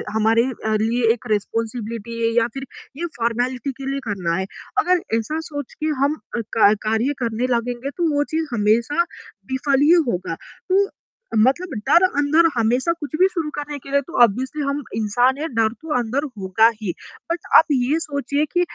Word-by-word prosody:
हमारे 225 +2 +3 0.4
लिए 230 0 +2
एक 245 +1 -10
रिस्पॉन्सिबिलिटी 230 +1 -3
है 230 - +1
या 230 0 +4
फ़िर 270 0 -6 0.4
ये - - 0
फॉर्मेलिटी 245 +3 -1
के 270 - -3
लिए 275 - -2
करना 180 -5 -1
है। 190 - -1 0.3
अगर 360 -1 +3 0.2
ऐसा 305 +8 -2
सोच 285 -3 -6
के - - +1 0.2
हम 295 +2 +2 0.4
का 210 -1 +6
कार्य 230 +6 +1
करने 230 +2 -1
लगेंगे 245 +3 -3
तो 330 -3 +1
वो 290 - +3
चीज़ 320 -1 0
हमेशा 230 +8 +2 0.5
विफ़ल 270 +1 +1
ही 300 +3 +5 0.2
होगा, 180 -5 -2
तो 390 - -1 0.5
मतलब 270 +11 +3 0.2
डर 345 +2 +6
अंदर 310 +1 +3
हमेशा 245 +8 +2
कुछ 310 -2 -6
भी 375 - +6
शुरू 330 -5 -3
करने 295 0 -5
के 275 - -12
लिए 280 0 +3
तो 280 -2 -2
ऑब्वियसली 260 +7 0
हम 280 +1 -1
इंसान 245 +5 +2
हैं 320 - -2
डर 225 -1 +3
तो 320 -1 -4
अंदर 250 +5 -1
होगा 195 +4 +3
ही 190 -4 -1 0.4
बट 340 - -1 0.2
आप - - +8
ये 275 +4 +2
सोचिए 285 -1 -1
कि 355 - +3
255 Hz, 175 wpm, -21 LUFS, 225-295 Hz, 0.5 s, आप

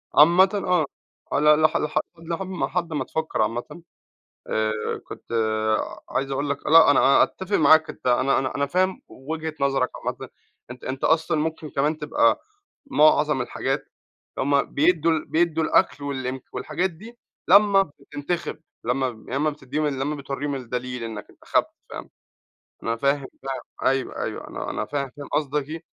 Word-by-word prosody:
عامةً 175 +5 +7
آه، 180 -5 +1 0.5
على 150 +1 +5
ل 155 - -1
لح 155 0 +4 0.4
لحم 175 +3 -4
لحد 170 -2 -2
ما 145 -3 -1
تفكر 160 -5 -2
عامةً 120 +9 -3 0.7
آآ، 110 0 0 0.4
كنت - - -9 0.9
عايز 135 0 -2
أقول 140 +1 -1
لك 140 0 -3
لأ، 160 -1 +8
أنا 145 - +4
أنا 135 - +6
أتفق 190 +2 -2
معاك. 160 +1 +5
أنت - - -6
أنا 130 +2 +3
أنا 130 -1 -3
أنا 140 - +1
فاهم 185 +6 0
وجهة 160 +3 -5
نظرك 135 -2 +1
عامةً. - - -5 0.4
أنت 125 - -11
أنت 130 +1 -5
أصلًا 160 -1 +2
ممكن 155 0 -3
كمان 150 +3 0
تبقى 150 -6 +2 0.5
معظم 150 - +4
الحاجات 125 - -2 0.5
هُم 140 +1 +2
بيدوا 165 +2 +3
بيدوا 165 -1 +1
الأكل 145 - +2
والإمك 130 -2 -4
والحاجات 190 +2 -1
دي 220 +8 -13 0.3
لما 200 +1 +6 0.2
بتنتخب، 160 +3 -4 0.2
لما 125 +3 0 0.2
لما 140 +4 +1
بتديهم، 150 +1 -3
لما 140 +1 -2
بتوريهم 140 0 -4
الدليل 125 -1 -4
إنك 110 -2 -7
انتخبت، - - 0 0.2
فاهم. - - -8 0.7
أنا 115 - 0
فاهم 140 +3 0 0.2
ده 135 - -5 0.4
أيوه 135 0 -2
أيوه، - - -5
أنا - - -5
أنا - - -3
فاهم 140 -2 -3
فاهم 145 - -8
قصدك 145 -1 -1
إيه، 165 +2 -6
145 Hz, 150 wpm, -24 LUFS, 135-160 Hz, 0.9 s, لأ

